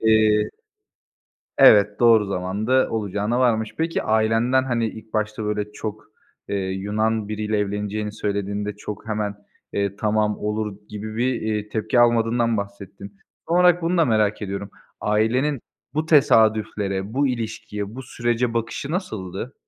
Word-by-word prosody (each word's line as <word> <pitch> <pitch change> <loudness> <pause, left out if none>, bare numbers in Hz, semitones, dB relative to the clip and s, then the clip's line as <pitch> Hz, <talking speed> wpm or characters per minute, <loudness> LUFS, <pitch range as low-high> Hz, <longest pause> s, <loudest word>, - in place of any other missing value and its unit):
eee 110 -1 +4 1.1
Evet, 105 -6 +6
doğru 115 -3 +6
zamanda 100 +7 0
olacağına 105 +2 -1
varmış. 110 -3 +1
Peki, 165 +1 0
ailenden, 115 +4 +2
hani, 120 -3 0
ilk 110 0 -11
başta, 105 0 -2
böyle, 105 0 -2
çok, 110 0 -6 0.4
eee, 100 - -1
Yunan 105 +3 -1
biriyle 105 0 -1
evleneceğini 105 +1 -2
söylediğinde 100 0 -3
çok 105 +1 -7
hemen, 105 -1 -2 0.4
eee, 100 0 -1
"Tamam, 105 0 0
olur." 105 -1 -3
gibi 110 +1 -6
bir, 125 +2 +1
eee, 105 -1 -2
tepki 110 +3 +1
almadığından 115 -1 +3
bahsettin. 100 0 -7 0.3
Son 170 - +1
olarak 180 -1 +5
bunu 170 +1 +1
da 165 - +5
merak 110 -4 +1
ediyorum. 100 0 -4 0.3
Ailenin 120 +6 +1 0.3
bu 155 +1 -1
tesadüflere, 110 -7 +2
bu 140 +2 +2
ilişkiye, 110 -3 -4
bu 130 - -6
sürece 120 -1 -1
bakışı 115 +4 -3
nasıldı? 110 - -4
110 Hz, 135 wpm, -23 LUFS, 105-115 Hz, 1.1 s, Evet